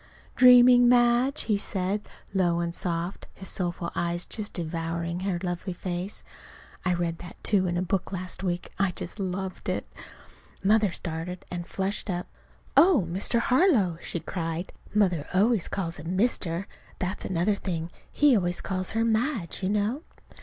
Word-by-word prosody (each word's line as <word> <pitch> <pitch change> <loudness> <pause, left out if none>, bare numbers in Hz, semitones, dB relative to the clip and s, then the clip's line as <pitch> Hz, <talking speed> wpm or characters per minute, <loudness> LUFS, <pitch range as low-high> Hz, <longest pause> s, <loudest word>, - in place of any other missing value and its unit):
"Dreaming, 250 -1 +8
Madge?" 245 +3 +4
he 210 -3 +1
said, 200 +1 -2 0.2
low 175 -3 +2
and 170 0 -2
soft, 175 +1 -3
his 190 - -7
soulful 175 -2 -2
eyes 175 0 -1
just 210 -2 -5
devouring 170 0 -3
her 190 -1 -1
lovely 180 +1 -3
face. 180 +2 -4 0.6
(I 185 - +1
read 170 -1 -2
that, 175 - -9
too, 190 -3 +2
in 175 0 -1
a 180 - 0
book 185 +1 -1
last 185 -1 -5
week. 180 -2 -2
I 195 -1 +3
just 180 +3 -7
loved 190 0 -3
it!) - - -2 0.8
Mother 210 0 +4
started 170 +2 -5
and 175 -1 -4
flushed 195 +2 -2
up. 175 -1 -2 0.5
"Oh, 330 - +6
Mr. 195 +6 0
Harlow!" 240 - +3
she 170 - -4
cried. 165 0 -4 0.2
(Mother 180 -8 +2
always 210 0 +3
calls 175 -3 -3
him 165 +5 -4
"Mr." 190 -5 +1 0.3
That's 185 +1 -3
another 185 +3 +1
thing. 175 -4 -3 0.2
He 290 -3 +5
always 175 -3 0
calls 185 -1 -2
her 225 0 +2
"Madge," 225 - 0
you 185 - 0
know.) 210 +7 0
185 Hz, 155 wpm, -27 LUFS, 175-210 Hz, 0.8 s, Dreaming